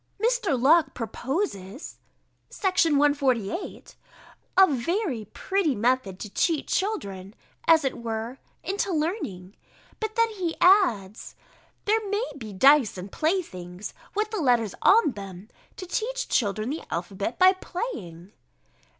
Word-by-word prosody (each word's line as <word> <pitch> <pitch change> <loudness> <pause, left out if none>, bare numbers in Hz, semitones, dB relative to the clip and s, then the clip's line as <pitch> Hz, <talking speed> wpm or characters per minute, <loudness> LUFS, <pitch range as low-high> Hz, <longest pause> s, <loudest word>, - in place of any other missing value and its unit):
Mr. 445 - +1
Locke 310 +5 +4
proposes 245 - -4 0.5
(Section 370 -5 +1
148) 280 - 0 0.6
a 385 - +9
very 295 - -1
pretty 335 - -1
method 225 -4 0
to 210 - -6
cheat 315 - 0
children, 200 - -3 0.3
as 325 -2 +6
it 265 - -1
were, 230 +2 -5 0.2
into 395 0 -1
learning: 300 - -3 0.4
but 435 -1 -4
then 460 0 +3
he 365 -6 -3
adds, 235 - +3 0.5
"There 435 +2 +3
may 410 +4 0
be 225 -7 -8
dice 265 +1 +5
and 185 +2 -8
playthings, 210 - -3 0.2
with 425 +1 -1
the 430 -5 -2
letters 240 -7 +2
on 415 -7 +5
them, 195 -1 -9 0.3
to 370 - -6
teach 470 +7 -2
children 215 +1 0
the 315 - -4
alphabet 195 +5 -3
by 370 +1 +7
playing." 210 - -6
280 Hz, 125 wpm, -26 LUFS, -, 0.6 s, a